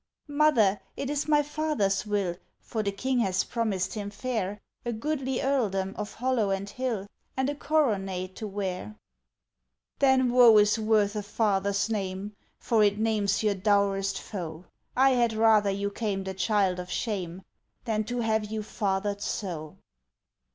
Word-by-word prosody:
"Mother, 285 -9 +3 0.2
it 280 0 -3
is 295 0 -1
my 295 -1 +4
father's 290 -10 0
will, 200 -4 0 0.2
For 220 - -3
the 200 -1 -1
King 250 +6 -1
has 190 -5 +1
promised 200 -6 -1
him 205 -2 -4
fair 210 -2 -3 0.2
A 240 - -2
goodly 265 +2 -2
earldom 200 -9 0
of 210 -1 -5
hollow 245 -4 +1
and 195 +1 -1
hill, 230 -3 -3 0.3
And 265 +2 +1
a - - -5
coronet 195 -12 0
to 215 - -4
wear." 185 - -4 1.0
"Then 260 -2 +4
woe 240 -3 +8
is 210 +2 +4
worth 215 -1 +2
a 210 - -1
father's 200 -1 0
name, 200 -1 -3 0.3
For 225 -2 +2
it 205 0 +3
names 215 -2 +1
your 210 -1 +3
dourest 195 -1 +1
foe! 170 -4 -7 0.3
I 265 +1 +6
had 240 -3 +2
rather 220 -2 +4
you 200 +1 -1
came 200 -3 -2
the 190 0 -4
child 190 -2 +1
of 180 0 -6
shame 190 -5 -3 0.4
Than 215 -2 0
to 245 +2 -2
have 220 -1 +1
you 220 -1 -2
fathered 200 -1 -2
so." 165 -9 -4
210 Hz, 155 wpm, -28 LUFS, 195-240 Hz, 1.0 s, woe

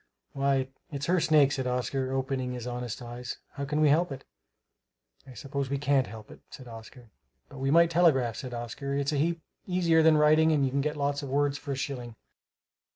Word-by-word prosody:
"Why, 135 -1 0 0.2
it's 140 -1 -4
her 180 +1 +2
snake," 150 -4 +4
said 130 -2 -2
Oscar, 130 +1 -2
opening 130 -1 -2
his 120 -2 -6
honest 125 -1 -5
eyes; 120 0 -7
"how 140 0 -5
can 150 +2 -1
we 150 - +5
help 165 +3 +2
it?" 135 - -7 1.0
"I 130 - -12
suppose 140 0 -4
we 140 - -1
can't 140 -2 +2
help 110 0 -11
it," - - -13
said 130 - -11
Edmund. 115 +1 -12 0.4
"But 140 - -11
we 135 +1 -1
might 170 +3 +5
telegraph," 140 -9 +3
said 130 - -6
Oscar; 120 +4 -4
"it's 140 +1 0
a - - 0
heap 165 +2 0 0.2
easier 170 -3 +3
than 160 -1 +5
writing 155 +1 +5
and 140 -3 +2
you 130 - -1
can 140 +1 0
get 150 +1 -2
lots 145 0 -1
of 140 - -6
words 145 +1 0
for 145 -2 -4
a - - -4
shilling." 125 -4 -5
140 Hz, 210 wpm, -28 LUFS, 130-150 Hz, 1.0 s, we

